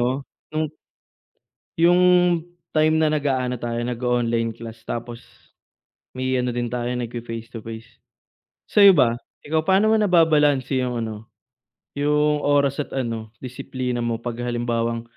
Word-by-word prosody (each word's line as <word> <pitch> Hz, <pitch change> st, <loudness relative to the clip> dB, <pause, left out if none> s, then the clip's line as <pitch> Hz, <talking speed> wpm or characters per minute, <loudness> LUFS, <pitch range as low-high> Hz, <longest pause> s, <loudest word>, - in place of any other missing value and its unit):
'no, 130 Hz, +3 st, 0 dB, 0.2 s
nung 155 Hz, +1 st, -1 dB, 1.2 s
'yung 175 Hz, +1 st, +5 dB, 0.7 s
time 155 Hz, 0 st, +3 dB
na 155 Hz, -, +3 dB
nag-aano 135 Hz, -4 st, 0 dB
tayo, 120 Hz, 0 st, -3 dB
nag-o-online 120 Hz, -1 st, 0 dB
class, 115 Hz, 0 st, -11 dB
tapos 120 Hz, 0 st, -6 dB, 0.9 s
may 130 Hz, 0 st, -1 dB
ano 125 Hz, -1 st, 0 dB
din 120 Hz, 0 st, -2 dB
tayo, 120 Hz, 0 st, -2 dB
nagfe-face 115 Hz, -1 st, -5 dB
to -, -, -5 dB
face, 115 Hz, 0 st, -8 dB, 0.8 s
sa'yo 200 Hz, -1 st, +8 dB
ba, 120 Hz, -6 st, +4 dB, 0.3 s
ikaw, 155 Hz, +1 st, -1 dB
paano 200 Hz, +3 st, +4 dB
mo 220 Hz, -, +4 dB
nababalanse 150 Hz, -8 st, +3 dB
'yung 125 Hz, -1 st, -1 dB
ano, 110 Hz, -1 st, -7 dB, 0.7 s
'yung 150 Hz, +1 st, +2 dB
oras 145 Hz, -1 st, +2 dB
at 150 Hz, -, -4 dB
ano 115 Hz, -4 st, -4 dB
disiplina 125 Hz, -1 st, -4 dB
mo 115 Hz, -1 st, -2 dB
'pag 120 Hz, -1 st, -5 dB
halimbawang 115 Hz, -1 st, -1 dB
125 Hz, 130 wpm, -23 LUFS, 115-145 Hz, 1.2 s, sa'yo